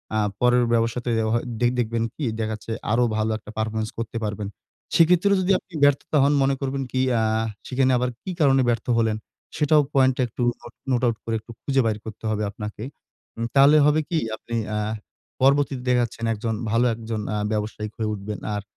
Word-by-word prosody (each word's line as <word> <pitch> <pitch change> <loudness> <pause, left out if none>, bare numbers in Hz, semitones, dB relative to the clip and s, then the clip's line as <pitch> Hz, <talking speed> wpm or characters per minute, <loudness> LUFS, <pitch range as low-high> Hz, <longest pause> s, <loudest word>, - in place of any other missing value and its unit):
আ - - +2 0.2
পরের 125 0 +4
ব্যবসাতে 115 +1 0 0.2
অ - - 0
হ - - +3 0.2
দে 120 - +3
দেখবেন 115 -1 0
কি? 155 - -5 0.2
দেখা 110 0 -1
যাচ্ছে 110 +1 -7 0.2
আরো 120 +2 +3
ভালো 110 0 0
একটা 105 -1 -12
পারফরম্যান্স 110 0 -2
করতে 115 0 -4
পারবেন। 105 -1 -3 0.5
সেক্ষেত্রেও 180 +4 +5
যদি 185 +1 +1
আপনি 185 - -26
ব্যর্থতা 145 +2 +3
হন 140 +1 +4
মনে 135 0 +2
করবেন 135 0 -2
কি? 130 - +1 0.2
আ - - +2 0.5
সেখানে 130 0 +2
আবার 125 0 0
কি 190 - -4
কারণে 135 -2 +5
ব্যর্থ 120 +1 -1
হলেন 110 -2 +1 0.4
সেটাও 150 0 +4
পয়েন্ট 130 -2 +4
টা - - +1
একটু 120 - -7 0.2
নোট 120 0 -12 0.2
নোট 120 -2 +2
আউট 115 -2 0
করে 115 -1 -1 0.3
খুঁজে 135 -1 +2
বাইর 110 -2 +1
করতে 110 0 -9
হবে 105 0 -1
আপনাকে। 105 +1 -7 0.5
উম 115 - -2
তাহলে 140 +2 +7
হবে 150 +1 +4
কি? 165 - +1 0.2
আপনি 115 - -6 0.2
আ - - 0 0.6
পর্বতীতে 135 -1 +3
দেখা 125 -1 +4
যাচ্ছেন 115 0 -4
একজন 110 +1 -2 0.2
ভালো 115 +2 +3
একজন 110 -1 -4
আ - - 0
ব্যবসায়ি 105 0 -3
হয়ে 110 -1 -1
উঠবেন। 105 +1 -6 0.2
আর 105 - -2
120 Hz, 195 wpm, -24 LUFS, 110-135 Hz, 0.6 s, তাহলে